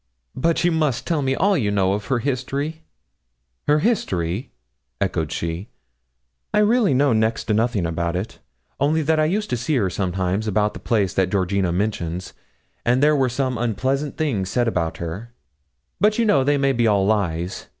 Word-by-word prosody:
'But 165 +6 +1
you 175 - +3
must 155 -6 0
tell 165 -4 0
me 135 -1 0
all 195 +6 +2
you 115 - +1
know 95 -2 +2
of 105 0 -3
her 130 - +1
history.' 140 +5 -2 0.9
'Her 150 - +5
history?' 95 - -1 0.5
echoed - - -1
she. 85 +5 -4 0.9
'I - - +3
really 215 - +3
know 140 -1 +3
next 110 +1 +1
to 110 - -1
nothing 110 -4 +1
about 85 +1 -2
it; 95 +5 -4 0.4
only 155 +3 +2
that 160 +1 +2
I 155 - +3
used 205 +6 -1
to 125 - +1
see 120 +6 -1
her 100 -8 +1
sometimes 95 +3 -1
about 105 0 +1
the - - -8
place 105 -5 0
that 95 -1 +1
Georgina 95 -1 0
mentions, 90 -2 -2 0.5
and 125 +3 +2
there 150 0 +5
were 135 -3 +2
some 130 -1 -1
unpleasant 130 +5 -1
things 110 -12 -1
said 120 +1 +1
about 85 -7 -1
her; 100 +9 -6 0.6
but 210 +1 +3
you 235 - +2
know 140 -11 +4
they 145 +2 +2
may 135 0 +2
be 120 -2 +2
all 100 -3 +3
lies. 95 -4 -1
120 Hz, 180 wpm, -22 LUFS, 95-145 Hz, 0.9 s, Her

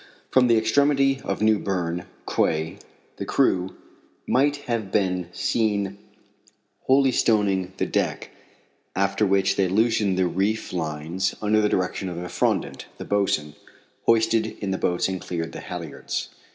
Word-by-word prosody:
From 130 -1 +5
the 115 -1 +4
extremity 135 +2 +3
of - - -2
New 110 -1 +4
Berne 90 -2 -2 0.2
quay 80 +1 0 0.4
the - - -4
crew 90 0 +1 0.5
might 140 +3 +2
have 115 -5 -2
been 90 -4 0
seen 100 -1 0 0.9
holystoning 105 -8 +3
the - - 0
deck, - - -2 0.6
after 100 +2 +1
which 100 0 +2
they 95 -1 +3
loosened 105 -1 +2
the 95 - +3
reef 100 +5 -1
lines, 80 +3 -2
under 110 0 +2
the 105 - +2
direction 95 0 -1
of 85 - -6
Effrondat, 90 0 -1
the - - -7
boatswain, 95 -7 0 0.5
hoisted 115 -1 +2
in 100 -2 -2
the 95 - -2
boats 90 - +1
and 95 -1 -3
cleared 80 -2 -4
the - - -7
halyards. - - -5
100 Hz, 140 wpm, -24 LUFS, 90-110 Hz, 0.9 s, From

